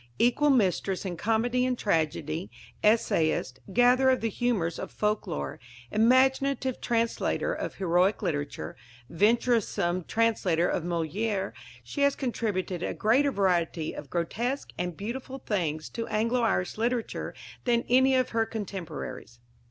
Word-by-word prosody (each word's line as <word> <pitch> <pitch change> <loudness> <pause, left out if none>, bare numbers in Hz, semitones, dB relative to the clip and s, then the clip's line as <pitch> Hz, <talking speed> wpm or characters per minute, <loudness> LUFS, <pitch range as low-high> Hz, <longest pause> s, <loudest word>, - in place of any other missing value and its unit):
Equal 245 +5 +3
mistress 195 - +1
in 180 -2 -3
comedy 225 +7 +1
and 255 -1 0
tragedy, 160 -3 -1 0.3
essayist, 200 - +2
gatherer 245 +4 +5
of 260 - +2
the 225 -1 -1
humours 200 -9 -1
of - - -5
folk 210 0 -1
lore, 70 -1 -4 0.3
imaginative 260 +3 +3
translator 235 - 0
of - - -4
heroic 185 +3 +2
literature, 145 -5 -3 0.4
venturesome 205 -3 +2
translator 200 -7 +1
of - - 0
Molière, 185 +5 -1 0.3
she 285 - -5
has 280 0 +4
contributed 200 - -2
a - - -2
greater 265 +7 +3
variety 175 -6 0
of 145 - -8
grotesque 235 - -2
and 175 -2 -3
beautiful 255 +5 -5
things 165 - -2
to 230 -1 -4
Anglo 230 +3 +1
Irish 215 -3 0
literature 235 0 -2 0.3
than 235 -1 +2
any 260 +2 +5
of 255 -1 +2
her 225 -1 0
contemporaries. 170 - -6
215 Hz, 130 wpm, -28 LUFS, 175-245 Hz, 0.4 s, gatherer